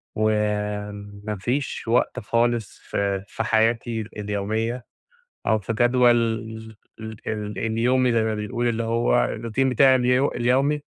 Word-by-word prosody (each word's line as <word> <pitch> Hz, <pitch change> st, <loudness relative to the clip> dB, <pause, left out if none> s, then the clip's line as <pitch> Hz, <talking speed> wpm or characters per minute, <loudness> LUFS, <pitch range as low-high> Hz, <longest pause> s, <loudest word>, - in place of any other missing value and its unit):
وما 105 Hz, -1 st, -2 dB
فيش 125 Hz, +4 st, -2 dB
وقت 120 Hz, +2 st, +1 dB
خالص 115 Hz, -1 st, 0 dB
ف -, -, -8 dB, 0.3 s
في -, -, -4 dB
حياتي 115 Hz, +1 st, +1 dB, 0.2 s
اليومية 110 Hz, +4 st, -2 dB, 0.6 s
أو 110 Hz, -1 st, +3 dB
في 105 Hz, +2 st, -4 dB
جدول 120 Hz, +2 st, +4 dB
ال 110 Hz, -1 st, -1 dB, 0.5 s
ال 105 Hz, -1 st, -4 dB
اليومي 120 Hz, +3 st, +2 dB
زي 115 Hz, -1 st, +2 dB
ما 110 Hz, 0 st, 0 dB
بيقول، 120 Hz, +3 st, -2 dB
اللي 115 Hz, 0 st, -1 dB
هو 115 Hz, -, +2 dB
الروتين 120 Hz, +4 st, -1 dB
بتاعي 130 Hz, +1 st, +5 dB
الي 125 Hz, 0 st, +2 dB
اليومي. 135 Hz, +5 st, +1 dB
115 Hz, 125 wpm, -23 LUFS, 105-120 Hz, 0.6 s, بتاعي